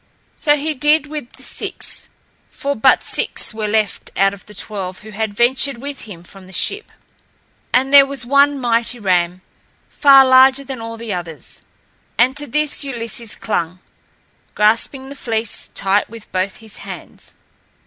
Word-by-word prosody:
So 295 -1 +2
he 305 +2 -2
did 300 +3 +2
with 295 -4 -7
the - - -12
six, - - -5 0.4
for 280 +1 -3
but 260 +4 +4
six - - -3
were 215 -1 -3
left 215 -2 -1
out 195 0 +3
of 200 - -13
the 210 - -12
twelve 190 -2 -5
who 215 0 -11
had 215 0 -3
ventured 260 +3 +2
with 280 +2 -7
him 170 -4 -10
from 190 +1 -15
the 190 - -14
ship. 405 - -2 0.8
And 265 +2 +2
there 280 -1 +9
was 275 -3 -3
one 280 +2 +3
mighty 235 0 +1
ram, 180 -3 0 0.5
far 275 -2 +7
larger 260 +1 +6
than 265 -3 -7
all 230 0 -7
the 225 -2 -5
others, 165 -6 -8 0.6
and 250 +4 +3
to 290 0 -3
this 300 +3 0
Ulysses 230 -4 -2
clung, 180 -5 -2 0.8
grasping 230 +5 +2
the 280 - -8
fleece 225 -5 -3
tight 195 +1 +1
with 230 -1 -12
both 185 +1 -1
his 220 -2 -8
hands. - - -10
230 Hz, 160 wpm, -18 LUFS, 205-275 Hz, 0.8 s, there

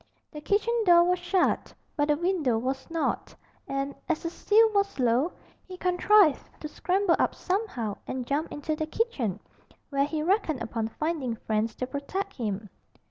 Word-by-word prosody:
The 300 - -8
kitchen 410 +7 +1
door 345 -3 +7
was 360 +1 +2
shut, 355 +1 0 0.2
but 290 -1 +1
the 295 -1 +2
window 335 -9 +1
was 265 +5 -3
not, 330 -1 -2 0.3
and, 275 +1 -2 0.2
as 330 - 0
the 335 - -2
sill 440 +4 +4
was 400 -1 +1
low, 255 +6 +2 0.4
he 370 -1 -8
contrived 360 -2 +4 0.2
to 305 - -5
scramble 365 +3 +1
up - - +1
somehow 360 - -2
and 255 -1 -3
jump 290 +5 -1
into 305 +1 -3
the 310 0 -3
kitchen, 310 - -1 0.5
where 275 0 +2
he 305 +1 -2
reckoned 335 - +1
upon 225 -1 -2
finding 285 -1 -2
friends 220 0 -1
to 255 - -3
protect 295 +9 -4
him. 210 -4 -3
310 Hz, 165 wpm, -27 LUFS, 255-365 Hz, 0.5 s, door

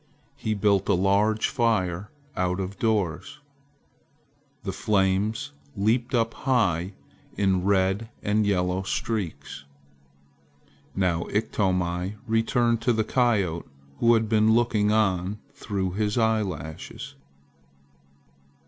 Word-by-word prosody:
He 110 -1 -2
built 100 -1 +2
a 100 - +5
large 100 +4 +2
fire 105 -6 0 0.3
out 90 0 0
of 95 +1 -5
doors. 105 - -1 1.3
The 95 - -3
flames 95 +2 0 0.3
leaped 120 +5 +1
up 115 -1 +1
high 100 - 0 0.4
in 95 -2 +2
red 100 +2 +1
and 105 +1 +2
yellow 90 -1 +1
streaks. 85 -9 -4 1.3
Now 90 -3 0
Iktomi 90 -2 -1
returned 115 +1 +1
to 120 0 +2
the 110 -1 +1
coyote 105 -9 +1 0.3
who 120 0 +5
had 110 -1 +1
been 110 0 +4
looking 110 -3 +2
on 95 -2 +1 0.2
through 100 -9 -3
his 105 +3 -1
eyelashes. 100 -9 -2
105 Hz, 105 wpm, -25 LUFS, 95-110 Hz, 1.3 s, a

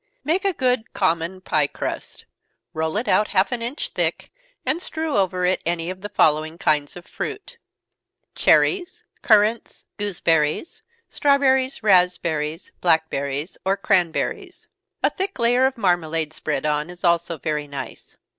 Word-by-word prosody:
_ - - -52 0.2
Make 365 +6 0
good 250 -3 0
common 175 0 0
pie 150 -5 +1
crust - - -6 0.5
roll 160 +4 -1
it 230 - -2
out 210 - +3
half 195 +4 +1
an 245 -2 -2
inch 245 +6 -3
thick, - - -1 0.3
and 335 - 0
strew 320 -4 -3
over 185 -2 +1
it 185 +1 +1
any 170 0 -2
one - - -1
of 185 0 -9
the 205 - -6
following 155 -3 +2
kinds 150 -3 0
of 175 - -10
fruit: 420 -2 -7 0.7
Cherries, 375 -1 +2 0.2
currants, 220 -1 +2
gooseberries, 170 - 0 0.3
strawberries, 265 -3 +2
raspberries, 175 -5 +1
blackberries, 160 -2 0
or 195 +1 +1
cranberries. 200 - -1 0.4
A - - +3
thick 390 +1 -4
layer 245 +2 +3
of 265 -1 -5
marmalade 165 -6 0
spread 150 -2 -3
on, 150 +1 0
is 180 0 -12
also 170 -1 +1
very 150 -1 -3
nice. 140 -1 -8
185 Hz, 145 wpm, -22 LUFS, 160-250 Hz, 0.7 s, out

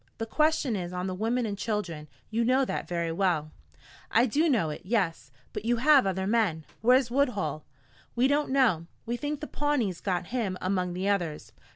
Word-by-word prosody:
The 225 - -3
question 305 0 +1
is 180 -2 -4
on 180 0 -3
the 185 - -2
women 230 +5 0
and 205 -2 -2
children. 200 -8 -3 0.2
You 230 +2 +1
know 260 +3 +3
that - - -3
very 170 -1 -1
well." 165 -4 0 0.6
"I 235 - +4
do 300 +7 +2
know 215 - +2
it - - -7
yes. 185 - -1 0.2
But - - -4
you 240 +1 +1
have 270 -2 +5
other 190 0 -1
men. 195 -8 +1 0.2
Where's 250 +1 +4
Woodhull?" 205 - 0 0.5
"We 245 +2 +4
don't 290 +1 +1
know. 235 -12 +2 0.2
We 235 - -2
think 290 +3 -4
the - - -3
Pawnees 285 - -1
got 185 -2 -1
him 210 -7 -1
among 185 -1 -1
the 185 +2 -2
others." 175 -7 -1
210 Hz, 190 wpm, -28 LUFS, 180-255 Hz, 0.6 s, have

